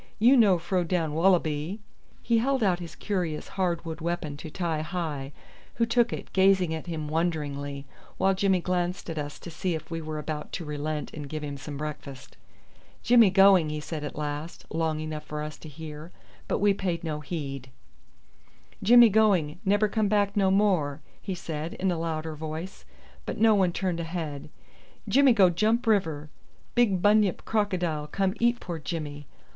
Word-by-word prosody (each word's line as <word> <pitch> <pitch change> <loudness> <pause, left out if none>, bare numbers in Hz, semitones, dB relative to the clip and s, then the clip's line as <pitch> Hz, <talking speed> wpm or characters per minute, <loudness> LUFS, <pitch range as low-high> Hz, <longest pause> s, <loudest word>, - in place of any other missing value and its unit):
You 240 +5 +6
no 210 -7 +5
fro 180 +2 -1
down 165 -3 -1
wallaby." 165 +1 +1 0.4
He 230 -1 +3
held 265 +1 +1
out 180 -3 +2
his 170 -2 -8
curious 180 -7 -3
hard 175 -3 -1
wood 160 0 -6
weapon 165 -3 -3
to 155 - -8
Ti 165 -2 -2
hi, 155 -5 -4 0.4
who 230 - +2
took 235 +1 +2
it, - - -6
gazing 190 -3 +4
at 160 +1 -5
him 160 -3 -4
wonderingly, 145 -4 -2 0.3
while 195 0 +3
Jimmy 190 -1 +2
glanced 180 0 -2
at 160 - -4
us 145 0 -5
to 170 - -10
see 175 +1 -2
if 160 +1 -8
we 165 0 -3
were 155 0 -5
about 150 0 -5
to 170 - -4
relent 150 0 -4
and 145 -2 -7
give 155 0 -5
him 145 -1 -4
some 140 +1 -7
breakfast. 140 -3 -7 0.7
"Jimmy 235 -4 +6
going," 190 -4 +6
he 150 0 -3
said 150 0 -5
at 150 - -5
last, 150 +2 -5
loud 160 -1 0
enough 155 -1 -5
for 150 0 -5
us 150 0 -6
to 155 - -10
hear; 155 +2 -9 0.4
but - - 0
we 205 0 +3
paid 180 -4 -2
no 155 -2 -3
heed. 135 -4 -5 1.1
"Jimmy 240 +2 +8
going; 190 -7 +2
nebber 205 +1 +3
come 215 0 0
back 205 0 +1
no 195 -2 +3
more," 185 -8 +2 0.2
he 190 - -4
said 160 -1 -5
in 190 0 0
a 170 - -2
louder 160 -1 -3
voice; 160 +4 -7 0.4
but - - -3
no 220 0 +6
one 190 -3 +3
turned 180 -1 -2
a - - -2
head. 160 -5 -5 0.6
"Jimmy 275 -2 +5
go 190 -5 +5
jump 220 +7 +1
river. 160 -9 0 0.4
Big 205 -7 +2
bunyip 205 -2 +3
crocodile 180 -8 -1
come 190 +4 0
eat 235 0 +2
poor 170 -2 -5
Jimmy. 145 -2 -5
170 Hz, 180 wpm, -27 LUFS, 150-195 Hz, 1.1 s, Jimmy